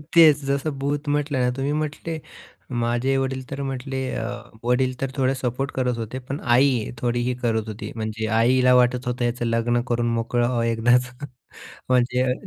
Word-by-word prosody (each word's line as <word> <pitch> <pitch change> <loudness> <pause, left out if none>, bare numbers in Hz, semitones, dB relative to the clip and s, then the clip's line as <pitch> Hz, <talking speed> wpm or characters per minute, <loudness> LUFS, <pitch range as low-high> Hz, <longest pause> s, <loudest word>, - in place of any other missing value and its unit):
तेच 155 -4 +7
जसं 140 +3 0
भूत 145 +2 -2
म्हटलं 145 -1 0
ना - - +2
तुम्ही, 135 +2 -1
मी - - 0
म्हटले, 155 +1 -3 0.6
माझे 120 +3 +1
वडीलतर 135 +1 -3
म्हटले 135 0 -3
अ, - - -2 0.4
वडील 125 +2 +2
तर 135 -1 -1
थोडे 130 0 +2
सपोर्ट 130 +2 -2
करत 125 -2 0
होते, 115 +3 -5
पण 135 +3 -5 0.2
आई 125 -3 +3
थोडी 120 0 0
ही 125 - +1
करत 110 -3 0
होती. 110 0 -6
म्हणजे 110 0 -3
आईला 125 +2 +4
वाटत 125 0 +3
होतं 125 0 -1
याचं 120 0 -1
लग्न 115 +1 +1
करून 120 -1 0
मोकळं 115 +1 0
व्हावं 120 -2 0
एकदाचं. 125 +3 +1 0.6
म्हणजे 125 0 +2
अ, - - +2
125 Hz, 175 wpm, -23 LUFS, 120-135 Hz, 0.6 s, तेच